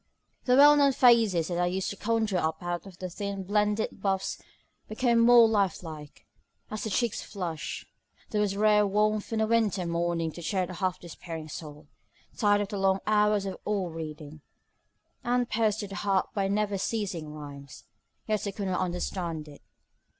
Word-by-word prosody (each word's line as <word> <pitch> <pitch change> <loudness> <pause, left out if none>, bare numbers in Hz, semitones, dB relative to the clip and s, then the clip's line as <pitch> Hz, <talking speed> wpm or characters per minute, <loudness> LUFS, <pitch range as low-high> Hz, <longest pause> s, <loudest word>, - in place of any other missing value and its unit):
The 250 - +3
old - - +5
well 290 +1 +8
known 280 -1 +4
faces 230 - +4
that 175 -1 -2
I 175 - +2
used 185 +1 -2
to - - -6
conjure 220 -3 0
up 160 +1 -2
out 175 +2 -3
of 185 -2 -13
the 185 - -5
thin 200 +2 -5
blended 210 +1 0
boughs 195 -1 -1 0.5
became 235 +1 +2
more 235 0 +7
life 200 -5 0
like, 155 -3 -10 0.5
as 215 - -4
the - - -2
cheeks 235 +2 0
flushed. 170 -6 -5 0.5
There 210 - +1
was 200 -1 0
rare 210 0 +4
warmth 210 +2 0
on 220 -1 0
a - - +3
winter 215 -5 +1
morning 170 -1 -1
to 175 - -10
cheer 185 +3 0
a 180 +1 -5
half 185 0 -2
despairing 165 -2 -8
soul, 150 -1 -9 0.5
tired 205 -2 +3
out - - +1
with 200 - -3
the 205 - -3
long 195 0 +2
hours 210 -1 +2
of 190 - -5
oil 195 -5 -1
reading, 155 -1 -8 0.8
and 245 0 +1
pierced 220 -2 0
to 205 - -5
the 195 - -8
heart 195 -2 0
by 195 -2 0
the 195 - 0
never 205 -2 0
ceasing 185 -9 -3
rimes; 140 -3 -10 0.4
yet 215 -1 -1
I - - -2
could 200 0 -4
not 180 - 0
understand 175 -3 -3
it. 145 -1 -13
195 Hz, 190 wpm, -28 LUFS, 170-215 Hz, 0.8 s, well